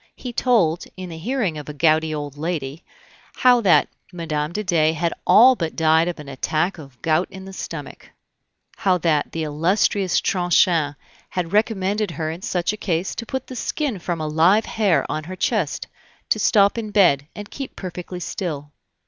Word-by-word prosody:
He 250 -2 -7
told, 200 -10 +2
in 185 -1 -6
the 165 - -7
hearing 205 - -1
of 150 - -9
a 150 - -7
gouty 160 +1 +3
old 145 -2 -5
lady, 155 -1 -4 0.5
how 250 -2 +5
that 190 -6 +4 0.2
Mme. 155 -3 -3
de 210 +4 -3
Dey 160 -4 +2
had 165 +1 -1
all 255 +4 +7
but 165 -7 -3
died 160 +1 +3
of 175 -2 -4
an 150 - -9
attack 155 +6 -1
of 135 -5 -13
gout 165 +3 +2
in 190 0 -10
the 195 - -9
stomach; - - -8 0.7
how 190 -4 +2
that 160 -4 0
the 165 - -3
illustrious 180 +5 +1
Tronchin 175 -4 +2 0.3
had 175 -1 -3
recommended 210 -1 +1
her 160 -2 -3
in 165 +3 -8
such 180 +1 -1
a - - -6
case 180 -3 -1
to 230 - -6
put 265 -1 -4
the 255 - -9
skin 255 -3 -2
from 170 -1 -3
a 155 - -2
live 170 +8 +4
hare 195 -10 +1
on 155 -1 -4
her 185 +2 -6
chest, 185 - -1 0.4
to - - +2
stop 200 +1 +4
in 215 -2 -5
bed, 175 -9 +3
and 205 0 -8
keep 275 -2 -7
perfectly 180 -1 -7
still. 155 -5 -5
175 Hz, 180 wpm, -22 LUFS, 155-205 Hz, 0.7 s, all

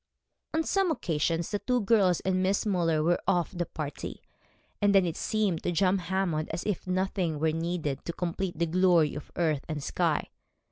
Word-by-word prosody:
On 320 - +2
some 390 +2 +1
occasions 165 - -1
the 205 - 0
two 250 +2 0
girls 195 -4 +3
and 185 -1 0
Miss 190 +2 +1
Müller 170 -6 +1
were 175 +2 +2
of 180 -1 +1
the 175 -1 -2
party, 150 -2 -6 0.6
and 205 -1 +4
then 190 -2 +6
it 170 -2 -2
seemed 210 -6 0
to - - -1
John 185 +3 +2
Hammond 175 -3 -1
as 165 +2 -4
if 205 -3 -3
nothing 185 -3 0
were 155 +1 +1
needed 165 -4 -2
to 170 - -3
complete 175 0 -3
the 170 - +2
glory 170 -3 +3
of 145 - -8
earth 155 -5 +1
and 150 -2 -3
sky. - - 0
175 Hz, 185 wpm, -28 LUFS, 160-195 Hz, 0.6 s, then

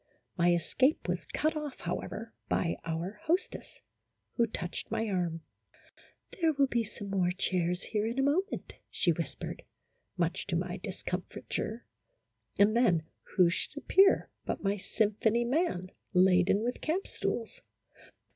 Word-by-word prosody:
My 175 0 +4
escape 255 - +1
was - - -2
cut 310 +1 0
off, 300 -3 -5
however, 225 +2 -4 0.2
by 170 - +1
our 165 +5 -3
hostess, 345 +3 -1 0.5
who 235 -1 +3
touched 175 -5 -5
my 225 - -1
arm: 175 -4 -1 1.0
"There 325 -1 +4
will 280 -1 +4
be 240 -3 +1
some 205 -1 -8
more 185 -3 +2
chairs 180 -1 0
here 215 -1 -1
in 235 +3 -3
a 270 - +3
mo 290 +6 +4
ment," - - -6 0.2
she - - +2
whispered, - - -4 0.6
much - - 0
to - - -1
my - - -1
discomfiture, 225 +2 -4 0.7
and 205 +2 +5
then 180 -10 +4 0.3
who 180 -2 +6
should 290 - -2
appear 385 +6 +4
but - - -3
my 200 0 +2
symphony 220 +3 +1
man, 240 - 0 0.2
laden 185 +2 +5
with 245 +1 -2
camp 345 +6 0
stools. 230 - -3
215 Hz, 140 wpm, -31 LUFS, 180-265 Hz, 1.0 s, who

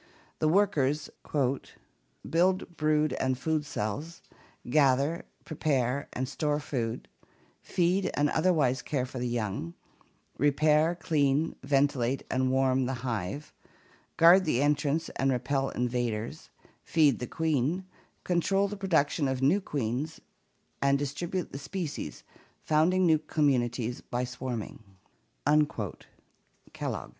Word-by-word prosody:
The 155 - +2
workers 155 -6 +2
" - - -21 1.0
build 180 +1 +1
brood 155 -1 +2
and 130 -1 0
food 155 +2 -1
cells, 145 +12 -4 0.4
gather, 140 +4 +2 0.2
prepare, 140 -4 0
and 130 +1 -2
store 150 +1 -1
food, 120 -6 -3 0.5
feed 180 +2 +1
and 145 +1 +3
otherwise 155 -6 +2
care 135 -4 -1
for 130 0 -7
the 125 - -1
young, 105 -8 -3 0.6
repair, 150 +4 +3
clean, 155 -2 +1
ventilate, 135 -2 +1
and 130 0 +1
warm 130 -1 +2
the 130 - -2
hive, 115 +4 -3 0.6
guard 175 +3 +7
the 140 -4 +2
entrance 150 +2 +1
and 135 0 +2
repel 135 +2 0
invaders, 120 +1 -2 0.3
feed 150 -5 +3
the 125 - -4
queen, 160 +3 0 0.4
control 195 +3 +1
the 205 +1 -6
production 160 -6 +1
of 130 0 -2
new 175 +10 +4
queens, 140 - -3 0.6
and 140 0 +3
distribute 165 +6 -3
the 140 - -6
species, 170 +1 -5 0.4
founding 175 +5 +3
new 160 -2 +4
communities, 125 -6 0
by 120 +1 -3
swarming" 125 -3 -5 1.9
(Kellogg). - - -4
145 Hz, 115 wpm, -29 LUFS, 130-160 Hz, 1.9 s, guard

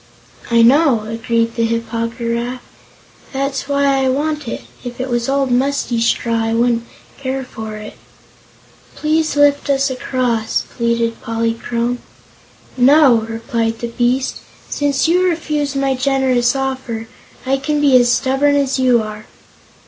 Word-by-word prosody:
"I 230 -1 +4
know," 265 -1 +4
agreed 230 +1 -1
the 230 - -1
Hip 230 0 -1
po 230 0 -1
gy 235 +1 -7
raf. 245 +2 -3 0.7
"That's 275 0 -2
why 280 0 +1 0.2
I 265 - +2
want 300 +1 -1
it. - - -5 0.2
If 245 0 -7
it 260 +1 -3
was 240 +1 0
old, 275 -1 +1
musty 255 -2 0
straw, 230 0 +1
I 225 0 0
wouldn't 235 0 +1 0.3
care 265 0 -3
for 220 -3 -7
it." 215 0 -9 1.0
"Please 310 0 0
lift 285 0 +3
us 275 0 +2
across," 250 -3 -1
pleaded 235 -1 0
Polychrome. 230 +1 -2 0.8
"No," 270 0 +6
replied 225 0 -2
the 235 - -4
beast; 245 +2 0 0.3
"since 285 0 +1
you 355 +2 +3
refuse 300 -4 -2
my 275 0 +1
generous 260 -2 +1
offer, 260 -4 -3 0.4
I 270 +1 +1
can 295 +2 -1
be 285 -3 +4
as 240 -1 +4
stubborn 270 +3 +2
as 275 -1 +1
you 250 -3 +3
are." 215 0 -8
250 Hz, 145 wpm, -17 LUFS, 230-275 Hz, 1.0 s, No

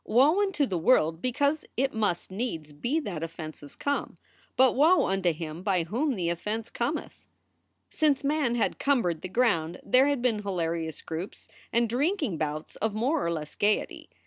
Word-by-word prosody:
"Woe 290 - +4
unto 385 -8 +1
the 185 -8 -2
world 165 -4 +3
because 285 +6 +1
it 270 +2 +1
must 205 -6 -1
needs 175 -8 -4
be 240 - -1
that 180 - -5
offenses 155 -3 -7
come, 285 0 -2 0.4
but 260 0 +6
woe 320 +7 +5
unto 190 -2 +1
him 160 +1 -6
by 185 -3 +1
whom 250 - -1
the 175 -4 -1
offense 210 +6 -4
cometh." - - -4 0.6
Since 295 -3 +2
man 280 -4 +1
had 235 - 0
cumbered 235 - +1
the 185 - -6
ground 180 -7 +1
there 255 +3 +4
had 285 -4 0
been 225 -4 +1
hilarious 165 -5 -3
groups 165 +5 -6 0.2
and 235 0 +2
drinking 275 - 0
bouts 155 0 -4
of 220 -1 -1
more 270 +8 +1
or 170 - 0
less 155 -2 -4
gayety. 210 +1 0
215 Hz, 170 wpm, -28 LUFS, 170-270 Hz, 0.6 s, but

